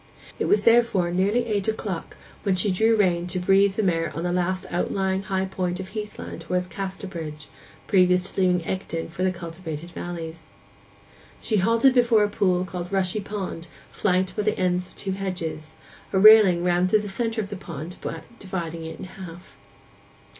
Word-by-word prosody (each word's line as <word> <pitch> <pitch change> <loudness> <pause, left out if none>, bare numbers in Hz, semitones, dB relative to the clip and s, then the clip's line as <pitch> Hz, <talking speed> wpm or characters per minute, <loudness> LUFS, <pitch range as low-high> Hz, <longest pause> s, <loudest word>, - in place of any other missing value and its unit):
It - - 0
was 205 0 +3
therefore 230 -7 +4
nearly 200 +7 +1
eight 205 -3 -1
o'clock 210 -5 -3 0.2
when 195 -3 +1
she 190 +2 +3
drew 220 +5 +3
rein 180 -4 +2
to 185 +1 -2
breathe 195 +2 +4
the 220 - 0
mare 165 -3 +1
on 165 - -3
the 175 0 0
last 185 +1 -1
outlying 190 +2 0
high 190 -1 -1
point 180 -1 -3
of 190 0 -6
heath 210 0 -6
land - - -7
towards 180 0 -1
Casterbridge, 180 -5 -6 0.4
previous 180 -2 +3
to 195 - -3
leaving 180 -2 +2
Egdon 170 -4 -3
for 170 - -7
the 185 0 +2
cultivated 170 -2 -7
valleys. 165 -2 -6 1.0
She 215 - 0
halted 230 +7 +4
before 240 -4 +4
a 205 - +1
pool 185 -3 +1
called 180 0 -6
Rushy 190 +1 +1
pond, 195 -4 -5 0.2
flanked 185 -2 0
by 210 - 0
the 215 0 0
ends 180 -1 0
of - - -21
two 195 - -3
hedges; 180 -5 -4 0.4
a - - +1
railing 200 -4 +8
ran 175 0 +2
through 210 +3 +3
the 210 - -6
centre 225 +3 -2
of 205 -2 -3
the - - -3
pond, 170 -2 -8 0.4
dividing 170 -4 -5
it 160 0 -7
in - - -7
half. 185 -1 -11
185 Hz, 180 wpm, -24 LUFS, 175-200 Hz, 1.0 s, railing